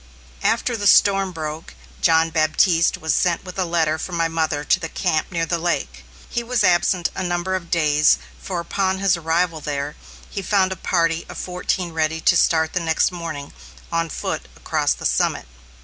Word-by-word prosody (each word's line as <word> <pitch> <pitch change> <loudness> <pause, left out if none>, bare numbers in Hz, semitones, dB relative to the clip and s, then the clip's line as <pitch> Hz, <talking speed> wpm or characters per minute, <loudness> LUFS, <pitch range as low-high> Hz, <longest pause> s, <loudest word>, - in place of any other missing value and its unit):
After 240 - +1
the 205 -2 0
storm 195 0 +5
broke, 155 - -6 0.3
John 160 0 +3
Baptiste 165 +2 +3
was 160 -1 -1
sent 175 -1 +1
with 185 +1 -7
a 185 - +1
letter 160 -2 0
from 175 +2 -5
my 165 0 +2
mother 160 -3 -1
to 180 - +2
the 165 -2 -5
camp 165 -2 -1
near 165 -2 -1
the 170 0 -1
lake. 170 +1 -2 0.2
He 240 - -2
was 235 0 0
absent 175 0 +2
a - - -4
number 175 +1 -1
of 180 -3 -3
days, 150 -3 +3 0.2
for 180 -3 -3
upon 190 +2 -1
his 195 -1 +2
arrival 165 0 0
there, 145 0 -3 0.3
he 200 - -5
found 190 -1 +2
a - - -2
party 165 -2 0
of - - -8
fourteen 180 -1 -2
ready 160 0 0
to - - +3
start 160 0 +2
next 165 -1 +1
morning, 165 -5 -6 0.4
on 165 0 0
foot, - - -4
across - - 0
the - - -9
summit. - - +1
170 Hz, 180 wpm, -21 LUFS, 160-185 Hz, 0.4 s, storm